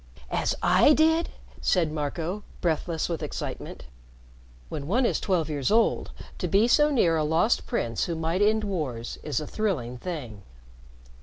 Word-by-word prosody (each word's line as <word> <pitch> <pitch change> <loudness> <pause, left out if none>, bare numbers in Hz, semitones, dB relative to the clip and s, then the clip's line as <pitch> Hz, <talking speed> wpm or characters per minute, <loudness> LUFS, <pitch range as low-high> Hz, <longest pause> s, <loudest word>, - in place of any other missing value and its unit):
"As - - 0
I 300 - +6
did?" 320 +2 +3 0.3
said 170 -4 +2
Marco, 160 +6 -3 0.2
breathless 165 -1 -1
with 170 -3 -3
excitement. - - -6 0.8
When 140 -1 -6
one 245 +8 +2
is - - +1
twelve 180 -6 0
years 145 -4 -1
old, 225 +2 +2 0.3
to - - -1
be 205 +3 +4
so 295 +5 +5
near 175 - +3
a 155 - +1
Lost 165 +9 +1
Prince 115 - -1
who 170 - -3
might 165 +4 -1
end 215 +1 +3
wars 145 - -4
is 150 - -2
a 155 - -5
thrilling 140 - -2
thing. 130 - -6
170 Hz, 155 wpm, -26 LUFS, 150-215 Hz, 0.8 s, I